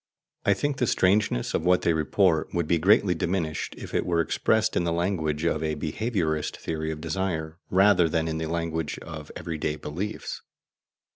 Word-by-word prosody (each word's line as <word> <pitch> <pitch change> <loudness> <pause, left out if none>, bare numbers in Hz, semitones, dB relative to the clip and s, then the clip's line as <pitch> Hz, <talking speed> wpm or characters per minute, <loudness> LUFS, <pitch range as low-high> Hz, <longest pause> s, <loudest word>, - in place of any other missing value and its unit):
I 100 - +5
think 145 +7 -1
the 125 - +1
strangeness 95 -11 +2
of - - 0
what 90 +1 +3
they 85 - +3
report 80 +1 +1
would 85 -2 0
be 85 0 +2
greatly 95 +1 +4
diminished 85 -2 -2
if - - -9
it - - +1
were 85 -1 0
expressed 110 +6 +1
in - - +2
the 85 - 0
language 85 -3 -1
of 80 -2 +1
a 80 -1 -1
behaviourist 80 -3 -1
theory 80 -1 -3
of 80 - -5
desire, 80 -1 -3
rather 95 -3 +5
than 80 0 0
in 80 0 -2
the 80 - -2
language 80 -2 -2
of 75 -2 -8
every 80 -2 -5
day 75 - -1
beliefs. 80 +8 -5
85 Hz, 185 wpm, -26 LUFS, 80-95 Hz, -, I